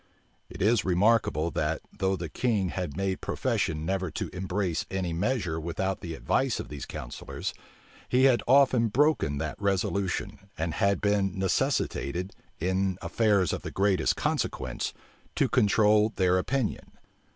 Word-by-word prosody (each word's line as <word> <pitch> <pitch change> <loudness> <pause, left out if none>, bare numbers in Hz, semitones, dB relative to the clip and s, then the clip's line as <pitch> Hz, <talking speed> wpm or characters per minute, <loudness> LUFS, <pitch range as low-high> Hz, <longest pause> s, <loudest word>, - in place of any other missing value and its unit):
It - - -4
is 110 -1 +3
remarkable 90 -4 +2
that, 75 +1 -1
though 95 -2 +1
the 85 -2 -5
king 105 +1 0
had 85 -5 -4
made 95 -1 -1
profession 75 0 -1
never 95 0 -1
to - - -4
embrace 90 -1 -1
any 95 -3 -2
measure 90 -3 -1
without 90 +4 -2
the 85 -1 -5
advice 130 +8 0
of - - -6
these 70 -2 -7
counsellors, - - -6 0.6
he 125 +1 +3
had 130 -3 +5
often 130 -3 +5
broken 135 - +2
that 70 - -4
resolution, 100 -1 -1 0.2
and 80 0 -2
had 100 +4 +1
been 100 -2 +1
necessitated, 90 -2 0 0.3
in 95 +2 0
affairs 100 -7 +2
of - - -3
the - - -5
greatest 95 -4 +2
consequence, - - -2 0.4
to - - +3
control 105 +1 +4
their 95 -1 +3
opinion. 125 +3 -2
95 Hz, 140 wpm, -28 LUFS, 85-105 Hz, 0.6 s, had